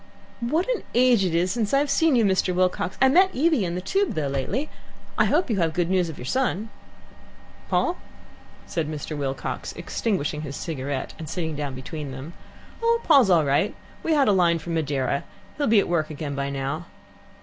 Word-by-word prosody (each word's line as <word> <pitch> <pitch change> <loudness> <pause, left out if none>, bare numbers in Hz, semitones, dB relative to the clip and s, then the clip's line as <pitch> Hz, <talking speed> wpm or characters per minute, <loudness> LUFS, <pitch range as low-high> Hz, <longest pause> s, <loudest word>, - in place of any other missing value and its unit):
"What 300 +9 0
an - - -6
age 245 -4 +5
it 175 -3 0
is 180 +2 +2
since 225 +2 0
I've 280 +1 +2
seen 325 -3 +3
you, 230 -3 +4
Mr. 190 -2 +2
Wilcox. 185 0 0
I 265 - +6
met 370 +8 +5
Evie 305 -4 +3
in 170 0 -3
the 180 - -3
Tube, 390 - 0
though, 150 -3 -1
lately. 190 - -2 0.5
I - - +3
hope 340 +4 +2
you 220 - 0
have 165 -3 0
good 175 0 0
news 180 -3 +2
of 160 - -8
your 125 - -8
son." 225 - -1 1.0
"Paul?" 350 - +1 0.7
said 160 -3 -2
Mr. 155 0 -5
Wilcox, 135 -2 -4
extinguishing 160 -9 -2
his 140 -2 -6
cigarette, 140 -4 -4
and 160 -2 -6
sitting 160 -4 -3
down 145 -2 -4
between 145 +3 -6
them. 135 +5 -8 0.5
"Oh, 465 0 +3
Paul's 275 -10 +6
all 165 -4 +4
right. 140 +9 +1 0.3
We 325 - +1
had 285 -3 +4
a - - +5
line 175 -3 +3
from 165 +1 -5
Madeira. 140 -4 0 0.4
He'll 285 - +1
be 220 -2 +5
at - - 0
work 165 -3 0
again 150 -1 -5
by 140 0 -2
now." 140 +4 -3
175 Hz, 195 wpm, -24 LUFS, 150-240 Hz, 1.0 s, I